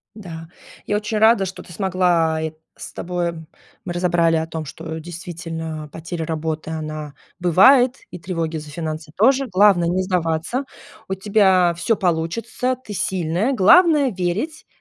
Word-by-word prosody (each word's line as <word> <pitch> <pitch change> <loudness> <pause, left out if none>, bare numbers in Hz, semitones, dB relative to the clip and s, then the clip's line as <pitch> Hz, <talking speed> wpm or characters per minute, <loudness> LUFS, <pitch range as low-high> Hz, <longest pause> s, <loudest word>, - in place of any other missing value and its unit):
Да, 165 -6 -9 0.4
я 205 - 0
очень 210 +1 -2
рада, 220 -2 +5
что 185 0 -7
ты 175 - -13
смогла 175 -3 +1
э, 160 -1 -3 0.2
с - - -9
тобой 175 -1 -2 0.5
мы 175 - -4
разобрали 175 -2 +2
о 160 - -1
том, 160 -1 -5
что 160 +2 -7
действительно 165 -2 -6
потеря 165 0 -5
работы, 160 0 -3
она 155 -2 -5 0.3
бывает, 245 - +5 0.2
и 180 - -7
тревоги 165 -3 -3
за 150 -1 -9
финансы 155 0 -5
тоже. 265 +6 +3
Главное 185 -3 +4
не 185 +2 +1
сдаваться. 180 - -1 0.4
У 190 - -1
тебя 190 -3 +3
всё 190 +6 +1
получится, 195 +9 -1
ты 250 -4 -11
сильная, 185 +6 0
главное 290 - +5
верить, 195 - -3
175 Hz, 145 wpm, -21 LUFS, 160-205 Hz, 0.5 s, рада